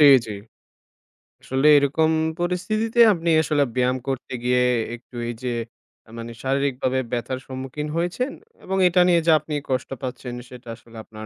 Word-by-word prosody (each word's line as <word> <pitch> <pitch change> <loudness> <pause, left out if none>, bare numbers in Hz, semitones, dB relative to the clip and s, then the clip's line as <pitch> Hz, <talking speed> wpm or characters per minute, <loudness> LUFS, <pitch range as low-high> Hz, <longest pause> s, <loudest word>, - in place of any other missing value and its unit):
জি, 150 - +8 0.2
জি। 105 - -5 1.1
আসলে 135 +3 +1
এরকম 155 +3 +2 0.3
পরিস্থিতিতে 215 +6 -1
আপনি 170 -1 -2
আসলে 145 -2 +2
ব্যায়াম 125 0 +2
করতে 135 -1 -4
গিয়ে 125 0 +3 0.3
একটু 120 +1 -17
এইযে 120 +2 -4 0.7
মানে 115 0 -6
শারীরিকভাবে 130 -1 0
ব্যথার 125 +1 -2
সম্মুখীন 135 +3 -5
হয়েছেন 180 +11 -1 0.3
এবং 190 +1 -2
এটা 180 +1 +4
নিয়ে 170 -2 +4
যা 160 - +7
আপনি 150 +1 -7 0.2
কষ্ট 130 -1 -1
পাচ্ছেন 125 -1 -5 0.2
সেটা 125 -1 -13
আসলে 115 0 -16
আপনার 110 0 -10
135 Hz, 145 wpm, -23 LUFS, 125-165 Hz, 1.1 s, জি